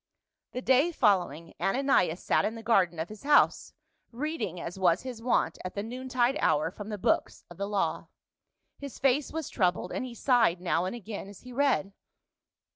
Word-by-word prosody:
The 250 - -4
day 265 +6 +4
following 180 - +1
Ananias 195 -8 +2
sat - - +2
in 220 - -1
the 225 - -9
garden 190 -7 +2
of 160 +2 -3
his 215 0 -10
house, 290 +1 +3 0.4
reading 260 - -3
as 170 +2 -6
was 180 +1 +3
his 250 -3 -7
wont 245 +1 +1
at 185 - -6
the 200 - -2
noontide 255 +3 -1
hour 155 +1 +2
from 205 +2 -8
the 210 - -4
books - - 0
of 175 - -11
the 200 - -3
law. 205 -2 -1 0.7
His 280 -2 -8
face 270 +2 +1
was 320 -3 -4
troubled, 180 -2 0
and - - -3
he 250 -2 -7
sighed 230 -8 +3
now 175 -1 0
and 185 - -3
again 215 -3 -7
as 200 -1 -12
he 250 0 -11
read. 240 -8 +1
220 Hz, 185 wpm, -29 LUFS, 185-255 Hz, 0.7 s, day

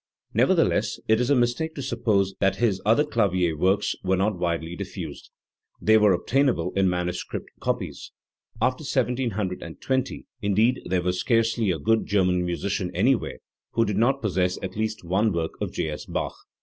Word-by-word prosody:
Nevertheless - - +2
it 110 +2 +4
is 125 - 0
a 145 - +5
mistake 120 +6 0
to 140 - -5
suppose 110 -6 +1
that 95 -1 +2
his 100 -3 +1
other 115 +7 +4
clavier 95 - +1
works 95 +6 +2
were 95 0 +1
not 100 +2 +1
widely 85 -1 -2
diffused, - - -7 0.5
Tjhey 110 0 +4
were 105 -3 +5
ob, - - -8
tainable 125 -10 +1
in 95 -1 +3
manuscript 90 0 -3
copies. 115 - -3 0.5
After 130 +5 +1
1720, 125 - -2 0.2
indeed, 110 +5 +2
there 90 -1 0
was 90 0 0
scarcely 115 -2 +2
a 90 - +1
good 110 +10 +1
German 90 -3 +2
musician 90 +2 -2
anywhere 130 -2 +1 0.4
who 115 - +3
did 105 -2 -2
not 135 +4 +2
possess 90 -3 +1
at 95 -1 -5
least 110 -1 -2
one 95 +5 +1
work 85 -2 -1
of - - -2
J. 80 - -2
S 75 - -7
Bach. - - -2
105 Hz, 165 wpm, -25 LUFS, 90-120 Hz, 0.5 s, a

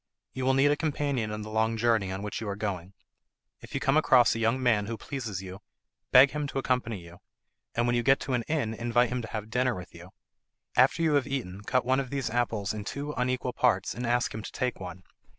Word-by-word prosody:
You 130 -1 -3
will 130 0 +3
need 140 +2 +4
a - - +3
companion 140 -7 -1
in 105 0 -4
the 110 - -8
long 110 +1 +1
journey 110 -4 +2
on 95 +1 -4
which 105 +2 -4
you 110 - -4
are 100 - -2
going. 100 -3 -4 0.7
If - - -10
you - - +1
come 135 +3 +2
across 130 -6 +5
a 115 - -3
young 115 +3 +2
man 110 -5 +2
who 115 0 -4
pleases 110 -10 -5
you 95 +2 -9 0.5
beg 135 +2 +7
him 150 -1 -2
to 140 - -5
accompany 125 -6 -1
you, 85 +1 -14 0.6
and 120 - +2
when 120 0 +2
you 120 - +2
get 135 +3 +4
to 135 - -3
an 125 - +1
inn 145 -8 0
invite 120 +1 +1
him 125 +1 -2
to 110 - -7
have 110 0 -6
dinner 125 0 +1
with 90 -1 -9
you. 85 +2 -12 0.7
After 135 +6 +4
you 160 -2 +3
have 145 -1 +2
eaten 110 -9 -4
cut 125 -2 +1
one 130 +2 +2
of 135 -2 -3
these 135 -4 -2
apples 110 -4 -1
in 105 -1 -5
two 140 +7 -4
unequal 125 0 -1
parts, 105 -7 +1
and 120 +2 -4
ask 120 0 +1
him 110 - -5
to - - -8
take 125 -1 -2
one. 90 -1 -8
120 Hz, 240 wpm, -28 LUFS, 105-130 Hz, 0.7 s, beg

